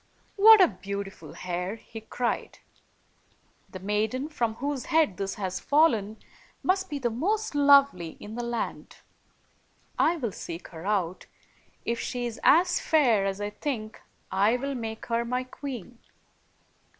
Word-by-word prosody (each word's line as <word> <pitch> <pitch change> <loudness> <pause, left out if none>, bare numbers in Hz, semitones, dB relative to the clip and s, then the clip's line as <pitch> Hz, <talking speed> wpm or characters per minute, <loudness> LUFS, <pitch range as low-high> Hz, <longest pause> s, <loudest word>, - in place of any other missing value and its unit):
"What 435 +1 +9
a 370 - +8
beautiful 200 0 -7
hair!" 180 +3 -4
he 225 0 -11
cried. 235 +2 -3 1.1
"The - - -8
maiden 215 +8 -1
from 235 -7 -1
whose 280 0 -3
head 315 - +2
this 195 0 -3
has 185 -2 -3
fallen 225 -9 +2 0.5
must 380 +1 +1
be 290 - -3
the 245 -4 -1
most 410 - -1
lovely 280 - +4
in 210 - -9
the 240 - -3
land. 235 -1 -4 1.0
I 340 - +4
will 240 -8 -2
seek 170 -1 -8
her 160 -2 -10
105 200 -3 +2 0.2
io6 - - -16
out; - - -39 0.5
if 235 0 -1
she 245 -1 -3
is 235 -2 -5
as 350 +4 +5
fair 240 -11 +3
as 195 0 -3
I 205 0 -3
think, 215 -2 -5 0.3
I 205 +5 +3
will 275 +2 -3
make 225 -3 -5
her 235 0 0
my 250 +2 -2
queen." 250 -4 -8
235 Hz, 150 wpm, -27 LUFS, 205-280 Hz, 1.1 s, What